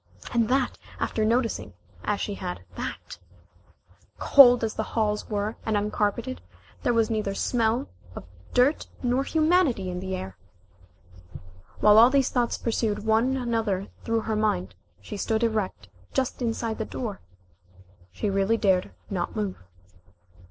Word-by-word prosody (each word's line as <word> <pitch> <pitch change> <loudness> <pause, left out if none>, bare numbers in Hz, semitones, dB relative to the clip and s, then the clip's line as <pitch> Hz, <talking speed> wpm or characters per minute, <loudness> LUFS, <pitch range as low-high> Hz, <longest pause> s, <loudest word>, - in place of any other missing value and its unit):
And 230 -2 +2
that 260 -1 +1 0.2
after 220 - -1
noticing 230 +1 0 0.3
as 210 -1 -1
she 205 - -2
had 180 -2 -5
that, - - -6 1.0
cold 245 -4 +7
as 220 - -1
the - - -2 0.2
halls 210 -1 0
were 210 +1 -2
and 220 -2 0
uncarpeted, 210 +4 -1 0.4
there - - +1
was 230 -1 +2
neither 210 -3 -1
smell 235 +2 0 0.3
of - - -7 0.3
dirt 255 +5 +3 0.2
nor 250 +2 +1
humanity 310 - +2
in 180 - -4
the 190 0 -3
air! 95 - -7 1.4
While 210 +1 +7
all 235 +2 +8
these 270 -1 +2
thoughts 240 -2 0
pursued 220 -2 -1
one 230 +5 +2
another 225 -6 -1
through 230 0 0
her 220 0 -2
mind 95 - 0 0.3
she 150 - -7
stood 220 +3 0
erect 210 - -1 0.3
just 260 -1 -1
inside 230 -1 -2
the 220 - -1
door. 220 -4 -5 0.9
She 95 - -3
really 195 +3 +2
dared 190 -4 +1 0.2
not 180 +1 -2
move. 205 - -3
220 Hz, 140 wpm, -26 LUFS, 205-240 Hz, 1.4 s, all